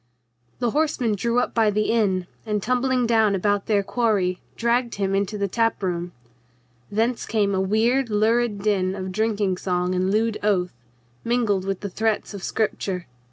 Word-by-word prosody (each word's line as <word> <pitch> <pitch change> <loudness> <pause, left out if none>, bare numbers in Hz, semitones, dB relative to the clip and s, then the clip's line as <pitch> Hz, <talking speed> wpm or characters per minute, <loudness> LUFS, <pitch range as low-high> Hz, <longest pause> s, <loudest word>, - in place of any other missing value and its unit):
The 240 -2 0
horsemen 290 -6 +1
drew 235 +4 0
up 245 - +1
by 225 -2 +3
the 210 +1 +1
inn 195 -6 +1 0.2
and, 210 -3 -2
tumbling 255 +1 +1
down 220 -3 +3
about 205 +1 0
their 205 -2 +2
quarry, 200 -5 0 0.2
dragged 235 +1 +1
him 195 -1 -1
into 200 +2 0
the 200 -1 0
tap 230 +1 0
room. 175 -1 -2 0.8
Thence 225 +4 0
came 205 -3 +1
a 190 - +1
weird, 230 +6 +2
lurid 215 0 +1
din 190 -3 +1
of 190 -1 -5
drinking 205 -2 0
song 180 -1 -1
and 185 +1 +1
lewd 220 +2 +1
oath, 190 -4 +1 0.5
mingled 225 -6 +1
with 195 -1 -3
the 200 - -4
threats 220 +1 -1
of 200 - -7
scripture. 190 -3 -2
210 Hz, 165 wpm, -23 LUFS, 190-230 Hz, 0.8 s, by